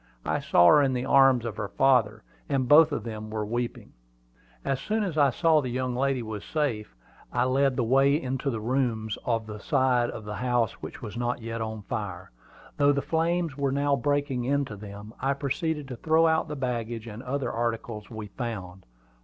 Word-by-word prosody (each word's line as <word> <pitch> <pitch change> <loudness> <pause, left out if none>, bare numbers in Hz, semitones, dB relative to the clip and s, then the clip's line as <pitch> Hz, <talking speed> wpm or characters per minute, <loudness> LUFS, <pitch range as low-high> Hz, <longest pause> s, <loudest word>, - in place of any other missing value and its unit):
I - - 0
saw 85 - +4
her 145 +12 +7
in 135 -2 +2
the 125 0 -2
arms 135 -3 +5
of 110 -3 -4
her 105 - -3
father, 110 -3 +2 0.3
and 135 -3 +1
both 155 +3 +7
of 145 - -2
them 110 -2 -6
were 110 -1 -3
weeping. 120 +2 -4 0.7
As 135 -2 0
soon 215 +9 -1
as 185 -6 -3
I 145 -3 +5
saw 160 +4 +3
that - - -6
the - - -2
young 125 0 -2
lady 135 -1 0
was 110 -2 -6
safe, 120 - -2 0.4
I 120 - +1
led 135 +1 +2
the 125 - +1
way 135 +5 +4
into 135 0 -2
the 115 -4 -2
rooms 115 -3 -1
on 115 -2 0
the 105 -1 -8
side 125 -1 +2
of 110 - -7
the 105 -1 -5
house 120 -1 +1
which - - -8
was 110 0 -6
not 120 -1 -2
yet 115 0 -4
on 110 -1 -4
fire, 95 -4 -5 0.5
though 145 0 +5
the 140 -1 0
flames 165 -1 0
were 140 -1 0
now 140 +1 +2
breaking 140 -1 0
into 140 -3 -1
them, 105 +1 -10
and 140 +1 0
proceeded 150 +1 -2
to 125 - -6
throw 160 +4 +3
out 160 0 +2
the 150 - -5
baggage 120 -4 -3
and 115 0 -8
other 135 +2 -2
articles 115 -2 -3
we 110 -2 -6
found. 100 -4 -6
125 Hz, 205 wpm, -27 LUFS, 110-140 Hz, 0.7 s, her